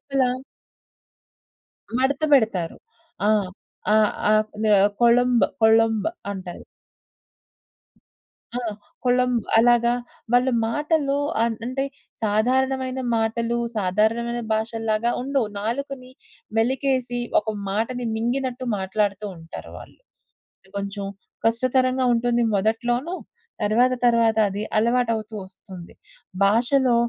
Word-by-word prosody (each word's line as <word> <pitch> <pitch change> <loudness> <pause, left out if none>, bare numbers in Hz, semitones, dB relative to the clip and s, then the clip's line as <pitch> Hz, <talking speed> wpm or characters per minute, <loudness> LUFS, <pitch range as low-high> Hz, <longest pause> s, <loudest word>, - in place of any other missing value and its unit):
ఇలా... 255 -2 +3 1.7
మడత 270 +3 +1
బెడతారు. 215 -11 +2 0.5
ఆ! - - +4 0.6
ఆ! - - +5 0.4
ఆక్‌నే 215 0 +2 0.3
కొళంబ్ 240 0 +4 0.2
కొళంబ్ 225 0 +4 0.2
అంటారు. 185 -3 -7 1.9
ఆ! - - 0 0.5
కొళంబ్ 250 -1 +2 0.2
అలాగా 235 +1 +4 0.4
వాళ్ళు 250 +2 +4 0.2
మాటల్లో 295 +2 0 0.2
అన్ 230 -1 +1
అంటే 255 +2 -2 0.4
సాధారణమైన 260 +4 +1 0.2
మాటలు, 230 +1 0 0.2
సాధారణమైన 220 +5 +1
భాషల్లాగా 225 +1 0
ఉండవు. 270 -3 0
నాలుకని 255 +4 -4 0.5
మెలికేసి, 255 +1 0 0.2
ఒక 210 - -15 0.2
మాటని 230 +5 -2
మింగినట్టు 250 +2 -2
మాట్లాడుతూ 200 +1 -1
ఉంటారు 165 0 -10
వాళ్ళు. - - -13 0.8
కొంచెం 200 0 -4 0.4
కష్టతరంగా 255 +2 +2
ఉంటుంది 240 0 +1
మొదట్లోను. 240 - 0 0.5
తర్వాత 240 +5 +3
తర్వాత 230 -2 +3
అది 200 +2 -4 0.2
అలవాటవుతూ 230 -1 +1
ఒస్తుంది. 185 -2 -12 0.5
భాషలో 245 +4 +3
235 Hz, 85 wpm, -23 LUFS, 215-255 Hz, 1.9 s, ఆ